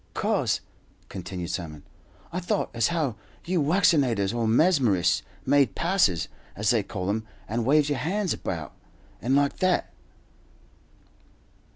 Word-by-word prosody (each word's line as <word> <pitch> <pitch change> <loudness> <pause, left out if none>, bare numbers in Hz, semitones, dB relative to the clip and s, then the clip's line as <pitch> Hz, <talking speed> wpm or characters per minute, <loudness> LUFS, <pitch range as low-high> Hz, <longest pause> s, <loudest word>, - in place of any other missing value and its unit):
"'Cause," - - 0 0.5
continued 90 -1 -5
Simon, 80 -5 -5 0.5
"I 180 - -1
thought 175 - -1
as 115 -1 +2
how 155 -10 -1 0.3
you 175 -1 +1
waccinators, 140 - +3
or 115 -1 0
mesmerists, 115 - +3 0.2
made 140 -4 +3
passes, 170 - +2 0.3
as 105 +3 +1
they 115 -3 +3
call 95 -2 -5
'em, 110 +1 -3 0.2
and 115 +1 -2
waved 150 +1 +4
your 145 -2 -1
hands 190 +3 0
about, 80 -5 -5 0.5
and 130 +4 +1
like 140 0 +2
that." 185 -1 +1
120 Hz, 130 wpm, -26 LUFS, 100-160 Hz, 0.5 s, waved